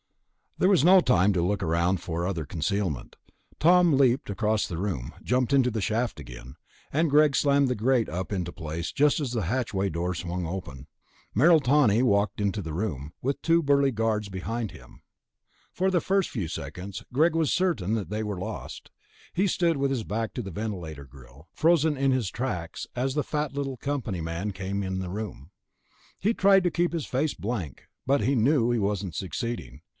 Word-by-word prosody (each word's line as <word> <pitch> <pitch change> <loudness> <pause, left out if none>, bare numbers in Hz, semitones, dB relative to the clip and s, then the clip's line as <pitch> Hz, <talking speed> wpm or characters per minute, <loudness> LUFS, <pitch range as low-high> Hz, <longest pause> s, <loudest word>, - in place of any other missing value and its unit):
There 185 - +3
was 185 -8 +4
no 185 +3 +8
time 105 - +3
to 90 - +1
look 95 +3 0 0.4
for 85 +2 -3
other 85 -5 -3
concealment. 80 -1 -2 0.4
Tom 175 0 +5
leaped 130 -3 +3
across 105 +2 0
the 85 - -5
room, 90 -10 -3
jumped 125 +1 +1
up - - +6
into 125 -2 +3
the 110 -1 -2
shaft 115 0 -1
again, 60 -2 -10 0.4
and 160 +3 +2
Greg 150 -1 +4
slammed 140 -1 +3
the 125 - 0
grate 120 +2 +1
up 90 +5 -4
into 90 -3 -2
place 80 -1 -5
just 150 +2 +3
as 140 -5 -2
the 115 -4 -1
hatchway 100 -2 -1
door 85 +2 -2
swung 90 +1 -4
open. 75 -6 -6 0.5
Merrill 160 - +6
Tawney 125 -4 +4
walked 105 -2 +1
into 100 +1 0
the 80 -4 -6
room, 80 -6 -3
with 135 +2 -1
two 165 0 +3
burly 140 -1 +3
guards 110 -2 -1
behind 105 +4 -3
him. - - -15 0.7
For 190 +1 0
the 180 -3 +2
first 195 +1 +1
few 100 -9 -3
seconds, 90 +4 -6
Greg 160 +5 +3
was 160 -2 +2
certain 120 - 0
that 110 -4 -2
they 105 +1 -2
were 105 -3 -3
lost. 90 - -7 0.4
He 195 +3 +2
stood 170 -3 +1
with 140 0 +1
his 125 -5 -1
back 110 +2 -3
to 125 - -4
the 95 - -7
ventilator 85 -8 -5
grill, 65 +3 -16
frozen 160 -2 +3
in 135 0 +2
his 125 -7 0
tracks 90 -8 -4
as 130 +2 -1
the 150 0 0
fat 150 -2 -2
little 135 -2 -3
company 120 -10 -3
man 85 +6 -3
came 95 +1 -3
in 95 0 -3
the 95 -1 -4
room. 95 - -6 0.7
He 215 +5 +1
tried 195 -1 +5
to 175 - +1
keep 175 +1 0
his 165 -4 -2
face 140 +4 -1
blank, 100 - -5 0.2
but 140 0 +2
he 130 +6 +1
knew 120 0 +3
he 120 - +1
wasn't 100 -3 -2
succeeding. 90 - -4
110 Hz, 190 wpm, -27 LUFS, 90-140 Hz, 0.7 s, no